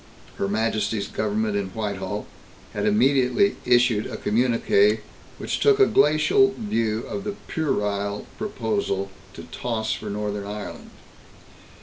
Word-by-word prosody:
Her 100 Hz, -, -1 dB
Majesty's 105 Hz, -1 st, 0 dB
Government 110 Hz, 0 st, -1 dB
in 100 Hz, -1 st, -1 dB
Whitehall 105 Hz, -2 st, -3 dB, 0.5 s
had -, -, -1 dB
immediately 130 Hz, -, +3 dB
issued 120 Hz, -3 st, +3 dB
a -, -, -6 dB
communiqué 110 Hz, -2 st, +2 dB, 0.4 s
which -, -, -3 dB
took 425 Hz, -1 st, +4 dB
a 405 Hz, -, +8 dB
glacial 205 Hz, -, +4 dB
view 115 Hz, -, -1 dB
of 200 Hz, -, -5 dB
the 205 Hz, -1 st, -4 dB
"puerile" 105 Hz, -9 st, -1 dB
proposal 200 Hz, -, -2 dB, 0.2 s
to -, -, -9 dB
toss 110 Hz, -3 st, -2 dB
for 105 Hz, -, -6 dB
Northern 105 Hz, 0 st, -3 dB
Ireland. 105 Hz, 0 st, -7 dB
110 Hz, 120 wpm, -24 LUFS, 105-135 Hz, 0.5 s, a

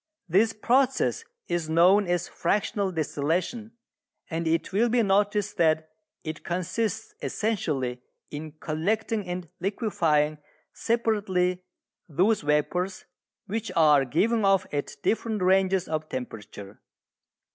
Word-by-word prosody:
This 200 Hz, +6 st, +3 dB
process 260 Hz, -, +1 dB, 0.2 s
is 170 Hz, -2 st, -2 dB
known 180 Hz, +5 st, +5 dB
as 175 Hz, -1 st, 0 dB
fractional 200 Hz, +2 st, 0 dB
distillation, 170 Hz, +8 st, -2 dB, 0.6 s
and 165 Hz, +1 st, -2 dB
it 165 Hz, +3 st, 0 dB
will 230 Hz, +5 st, +3 dB
be 235 Hz, 0 st, +3 dB
noticed 205 Hz, +1 st, +1 dB
that 160 Hz, -2 st, +2 dB, 0.3 s
it 155 Hz, -1 st, -6 dB
consists 215 Hz, +5 st, -2 dB
essentially 140 Hz, -, -2 dB, 0.3 s
in 150 Hz, +1 st, -6 dB
collecting 195 Hz, +7 st, -2 dB
and 180 Hz, -1 st, -4 dB
liquefying 160 Hz, -7 st, +1 dB, 0.3 s
separately 200 Hz, -6 st, 0 dB, 0.5 s
those 190 Hz, +9 st, +2 dB
vapours 180 Hz, +6 st, 0 dB, 0.4 s
which 215 Hz, 0 st, -3 dB
are 150 Hz, -4 st, +5 dB
given 215 Hz, -, +1 dB
off 195 Hz, -2 st, +3 dB
at 145 Hz, -1 st, -3 dB
different 220 Hz, -3 st, 0 dB
ranges 190 Hz, 0 st, +3 dB
of 155 Hz, 0 st, -3 dB
temperature. 105 Hz, -5 st, -7 dB
180 Hz, 110 wpm, -26 LUFS, 155-210 Hz, 0.6 s, known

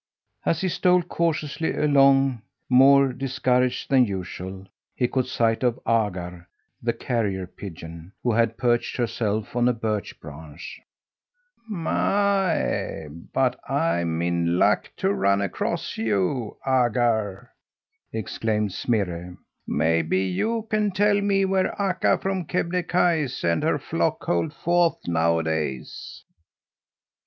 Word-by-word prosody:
As 165 Hz, -, +1 dB
he 190 Hz, -, 0 dB
stole 180 Hz, 0 st, +3 dB
cautiously 160 Hz, -2 st, -1 dB
along, 135 Hz, -4 st, +4 dB, 0.3 s
more 135 Hz, +1 st, +6 dB
discouraged 125 Hz, -1 st, 0 dB
than 130 Hz, -2 st, +6 dB
usual, 95 Hz, 0 st, -6 dB, 0.3 s
he 125 Hz, -, +1 dB
caught 130 Hz, 0 st, -1 dB
sight 115 Hz, -3 st, +1 dB
of 125 Hz, -2 st, +1 dB
Agar, 90 Hz, -6 st, -1 dB, 0.3 s
the -, -, +1 dB
carrier 100 Hz, -6 st, -2 dB
pigeon, 85 Hz, -2 st, -10 dB
who 120 Hz, -, +2 dB
had 115 Hz, 0 st, +1 dB
perched 120 Hz, -2 st, 0 dB
herself 110 Hz, -2 st, -2 dB
on 120 Hz, 0 st, +3 dB
a -, -, +2 dB
birch 110 Hz, -3 st, -3 dB
branch. 75 Hz, +2 st, -10 dB, 0.9 s
"My, 190 Hz, -, 0 dB, 0.2 s
but -, -, +1 dB
I'm 85 Hz, 0 st, 0 dB
in 85 Hz, 0 st, 0 dB
luck 105 Hz, +3 st, +2 dB
to 195 Hz, +1 st, +1 dB
run 100 Hz, -, +2 dB
across 100 Hz, -3 st, -2 dB
you, 110 Hz, +2 st, -1 dB
Agar!" 120 Hz, -4 st, +1 dB, 0.6 s
exclaimed 105 Hz, -1 st, -2 dB
Smirre. 90 Hz, -6 st, -2 dB, 0.3 s
"Maybe 80 Hz, +3 st, +1 dB
you 220 Hz, -, -1 dB
can 210 Hz, -1 st, +2 dB
tell 205 Hz, +1 st, +2 dB
me 195 Hz, -1 st, +2 dB
where 190 Hz, 0 st, 0 dB
Akka 190 Hz, -2 st, +2 dB
from 190 Hz, -2 st, -2 dB
Kebnekaise 170 Hz, -5 st, 0 dB
and 85 Hz, -1 st, +1 dB
her -, -, +1 dB
flock -, -, -1 dB
hold 85 Hz, -, 0 dB
forth 170 Hz, 0 st, +1 dB
nowadays?" 80 Hz, -5 st, -1 dB
115 Hz, 115 wpm, -24 LUFS, -, 0.9 s, more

